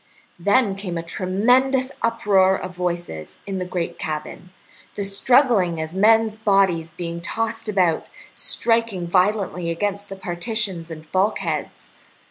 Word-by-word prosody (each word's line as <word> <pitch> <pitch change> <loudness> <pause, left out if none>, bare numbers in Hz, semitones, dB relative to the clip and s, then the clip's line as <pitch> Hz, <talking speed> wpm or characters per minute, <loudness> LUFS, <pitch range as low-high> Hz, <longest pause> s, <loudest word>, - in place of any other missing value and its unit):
Then 205 +3 +3
came 195 -3 -5
a 165 - -3
tremendous 245 +9 +2
uproar 195 -5 +3
of 185 - -7
voices 175 - -4
in 195 -1 -3
the 180 - -2
great 180 -2 -4
cabin, 155 +3 -5 0.5
the 200 - -2
struggling 200 - +3
as 160 +1 -4
of 190 - -4
men's 220 +1 +4
bodies 195 -6 +2
being 170 -1 -4
tossed 225 +4 -3
about, 180 -6 +1 0.3
striking 230 -6 0
violently 180 -1 +1
against 200 +4 -2
the 195 - -6
partitions 190 -1 -3
and 155 -1 -10
bulkheads. 190 +3 -1
190 Hz, 130 wpm, -22 LUFS, 175-220 Hz, 0.5 s, men's